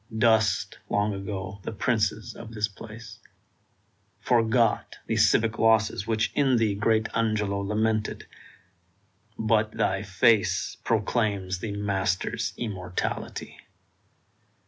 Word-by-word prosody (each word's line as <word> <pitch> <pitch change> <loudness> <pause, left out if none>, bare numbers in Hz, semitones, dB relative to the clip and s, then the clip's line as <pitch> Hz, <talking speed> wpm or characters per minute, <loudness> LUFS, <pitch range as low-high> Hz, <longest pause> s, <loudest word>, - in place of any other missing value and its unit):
Dust, 110 -1 +2
long 105 +1 +1
ago, 95 0 -5
the - - -5
princes 110 0 -1
of 115 0 -10
this 105 0 +1
place; 110 +1 -11 1.0
Forgot 115 0 +2
the - - -1
civic 110 -1 +3
losses 110 -3 +3
which 110 -1 +1
in 135 -3 +3
thee 110 -3 +2
Great 110 +2 +1
Angelo 105 -3 0
lamented; 110 +2 -1 1.1
but 110 -1 +1
thy 95 +1 0
face 105 +2 +2
Proclaims 105 -4 0
the 105 +1 -4
master's 95 -2 -1
immortality! 95 -6 -4
110 Hz, 100 wpm, -26 LUFS, 100-115 Hz, 1.1 s, civic